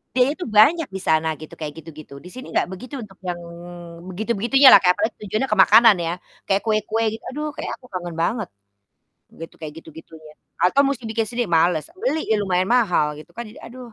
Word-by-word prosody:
Dia 255 +1 +4
itu 360 - -5
banyak 255 +9 +4
di 190 - -5
sana 160 0 +1
gitu 155 - -11
kayak 150 -2 -6
gitu-gitu, 155 -2 -12
di 180 - -12
sini 255 +6 -10
enggak - - 0
begitu 250 +8 -8
untuk 195 -3 -12
yang 175 -1 -3 0.7
begitu-begitunya 235 +6 +4
lah, - - +10
kayak 180 -1 +3
apalagi 215 +2 -2
tujuannya 215 +7 -2
ke - - -1
makanan 225 -1 +6
ya, 165 - -1 0.3
kayak 195 0 +1
kue-kue 220 +1 0
gitu. - - -31
Aduh 300 +2 -3
kayak - - -5
aku - - -17
kangen 175 -2 -6
banget 200 +6 -1 0.9
gitu, 165 +1 -10
kayak 155 -1 -7
gitu-gitunya 160 -1 -13 0.3
atau 225 +10 +3
mesti 255 -4 -4
bikin 225 0 -1
sendiri 245 0 -2
males, 165 -3 +2 0.2
beli 320 -9 -1
ya 215 -1 0
lumayan 185 -1 0
mahal 200 -11 +3
gitu - - -16
kan. 235 - -5
Jadi 215 -1 -13
aduh 245 -1 -11
210 Hz, 200 wpm, -21 LUFS, 175-240 Hz, 0.9 s, lah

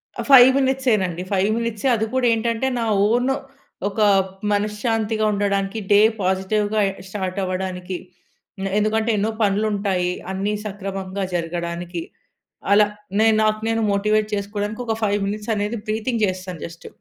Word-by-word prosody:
అ! - - -3
5 260 -2 +10
మినిట్సేనండి. 235 -10 +1
5 195 +1 +2
మినిట్సే. 230 +1 -2
అది 220 -1 0
కూడా 260 -1 +1
ఏంటంటే, 230 +2 0
నా 230 - 0 0.2
ఓను 245 +4 +2 0.5
ఒక 205 - -7 0.5
మనశ్శాంతిగా 215 +1 0
ఉండడానికి, 200 +1 -1
డే 205 - +7 0.2
పాజిటివ్‌గా 205 +3 0
ఎ - - -5 0.2
స్టార్ట్ 190 -1 -3
అవ్వడానికి. 185 0 -3 0.7
నె 195 - -1
ఎందుకంటే 220 +2 +1
ఎన్నో 210 +2 0
పనులు 205 +1 +2
ఉంటాయి. 190 -3 0 0.2
అన్ని 195 +2 -1
సక్రమంగా 195 -1 -4
జరగడానికి 170 0 -3 0.7
అలా. 210 0 +6 0.3
నేను 220 0 +5
నాకు 215 0 +1
నేను 225 0 +1
మోటివేట్ 210 +1 +1
చేసుకోవడానికి, 205 +2 -3
ఒక 225 - 0
5 205 -1 +1
మినిట్స్ 210 +2 -3
అనేది 210 +3 -2
బ్రీతింగ్ 220 +1 -1
జేస్తాన్ 185 -3 -5
జస్ట్. 170 0 -11
205 Hz, 140 wpm, -22 LUFS, 190-220 Hz, 0.7 s, 5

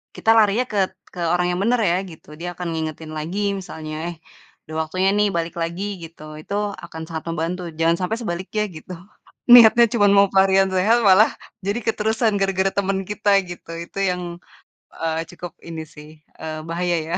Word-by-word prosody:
kita 225 - +2
larinya 220 +3 +4
ket 195 -2 +1 0.2
ke 180 - -9
orang 175 0 +2
yang 180 - -2
bener 240 +2 +2
ya, 175 -4 +2 0.2
gitu. 155 - -15
Dia 175 +1 -4
akan 180 -1 -4
ngingetin 160 0 -5
lagi 200 +6 -2
misalnya, 155 -4 -7
"Eh, 170 - -7 0.5
udah 155 - -9
waktunya 185 +3 +1
nih, 210 0 +4
balik 165 0 -2
lagi," 170 +4 -3 0.2
gitu, 165 -1 -11 0.2
itu 200 - -8 0.3
akan 160 -1 -9
sangat 160 -1 -5
membantu, 165 +3 -2 0.2
jangan 165 +1 +4
sampai 220 +5 -1
sebaliknya 190 +2 -2
gitu. 180 +4 -9 0.6
Niatnya 235 0 +9
cuma 205 -3 +4
mau 200 - +7
pelarian 195 0 +5
sehat, 220 +6 +3
malah 195 +4 +7 0.4
jadi 200 +3 0
keterusan 220 0 +1
gara-gara 195 0 +1
temen 195 -1 +1
kita 210 0 0 0.2
gitu, 175 -1 -9
itu 195 - -8
yang, 180 0 -2 0.7
eee, 160 0 -2
cukup 175 0 -8 0.2
ini 160 -1 -5
sih, 150 0 -12 0.3
eee, 155 -1 -5
bahaya 175 +1 0
ya. 175 - -1
185 Hz, 175 wpm, -22 LUFS, 165-205 Hz, 0.7 s, Niatnya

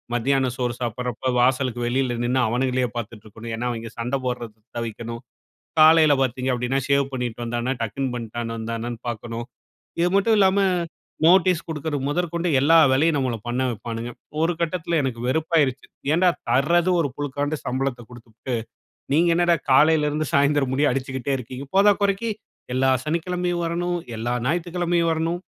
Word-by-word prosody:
மத்தியானம் 130 +1 +1
சோறு 125 -2 -1
சாப்பிடுறப்ப 125 +2 -2
வாசலுக்கு 125 -1 +1
வெளியில 125 -1 0
நின்னு 130 +2 +1
அவனுங்களையே 125 +1 0
பார்த்துட்டு 115 -2 -6
இருக்கணும். 115 +2 -8
ஏன்னா 120 +2 -3
அவிங்க 115 -1 -6
சண்ட 125 +4 -1
போடுறத 120 -3 -4 0.2
தவிர்க்கணும். 115 0 -5 0.6
காலையில 155 -1 +7
பார்த்தீங்க 130 +1 -1
அப்படின்னா, 125 +2 0
ஷேவ் 140 -1 +2
பண்ணிட்டு 120 -2 -3
வந்தானா, 120 +2 -1
டக்கிங் 130 +4 -2
பண்ணிட்டு 115 -1 -5 0.2
வந்தானான்னு 115 +1 -4
பார்க்கணும். 115 +1 -5 0.6
இது 175 - +3
மட்டும் 210 +3 +4
இல்லாம 195 0 +4 0.7
நோட்டீஸ் 180 0 +5
கொடுக்குறது 150 -2 -3
முதற்கொண்டு 170 +2 -1
எல்லா 160 +4 +5 0.2
வேலையும் 150 +4 +3
நம்மல 130 -4 0
பண்ண 125 +2 -1
வைப்பானுங்க. 115 +2 -5 0.3
ஒரு 165 +2 +2
கட்டத்துல 170 -1 -1
எனக்கு 125 -4 -3
வெறுப்பாயிருச்சு. 145 -1 +1 0.3
ஏன்டா 180 +3 +4 0.2
தர்றது 170 +6 +3
ஒரு 145 - +1
புழுக்காண்டு 145 +1 -2
சம்பளத்த 130 -1 -2
கொடுத்துபுட்டு, 120 +1 -8 0.6
நீங்க 170 +4 +4
என்னடா 175 0 +3 0.2
காலையில 150 +2 +5
இருந்து 155 +1 -2
சாயந்தரம் 140 -1 +3
முடிய 145 +2 +2
அடிச்சிக்கிட்டே 130 +1 -2
இருக்கீங்க. 125 +2 -7
போதாக்குறைக்கு 200 +2 +3 0.4
எல்லா 130 +1 +3
சனிக்கிழமையும் 175 +2 -1
வரணும். 175 +1 -1 0.2
எல்லா 120 +2 -2
ஞாயித்துக்கிழமையும் 175 +1 0
வரணும். 165 +2 -1
135 Hz, 140 wpm, -23 LUFS, 120-165 Hz, 0.7 s, காலையில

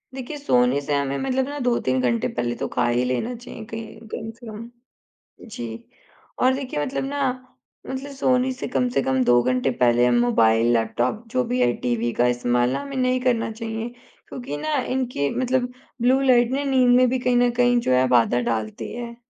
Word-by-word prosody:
देखिए 270 +3 -6
सोने 125 - +2
से 145 +1 -3
हमें 140 -1 -1
मतलब 265 0 0
ना 290 - -5
2-3 130 - +1
घंटे 120 -2 +1
पहले 120 0 -2
तो - - 0
ख़ा 120 -1 +2
ही 120 +1 +1
लेना 130 - -1
चाहिए 235 -2 -10
कहीं 225 0 -8
कम 225 - -5
से 240 - -12
कम, 220 +2 -8 0.8
जी। 115 - -8 0.5
और 255 +1 +4
देखिए 260 - -4
मतलब 265 - -3
ना, 285 - -3 0.7
मतलब 265 +2 -5
सोने 260 -1 +1
से 255 - -5
कम 250 0 0
से - - +3
कम 130 -1 +1
2 120 0 +4
घंटे 130 +1 +1
पहले 120 0 +4
हम 120 -1 +3
मोबाइल, 115 -1 +3
लैपटॉप 120 - 0
जो 125 - +1
भी 125 - +1
है 120 0 +4
टीवी 120 -1 0
का 125 - +4
इस्तेमाल 120 0 +1
ना - - -1
हमें 275 -1 -6
नहीं 255 0 +1
करना 235 -3 +1
चाहिए, 225 +1 -5 0.4
क्योंकि 245 - -6
ना 305 - -2 0.2
इनकी 240 - -1
मतलब 255 0 0 0.3
ब्लू 255 +2 +4
लाइट 245 -2 +4
ने 280 +1 -1
नींद 255 -2 +4
में 255 0 +5
भी 260 - 0
कहीं 250 0 +1
न 245 0 +3
कहीं 245 0 +4
जो 180 - -1
है 130 +1 +3
बाधा 120 +1 +2
डालती 110 -1 -4
है। 235 -1 -6
225 Hz, 200 wpm, -23 LUFS, -, 0.8 s, में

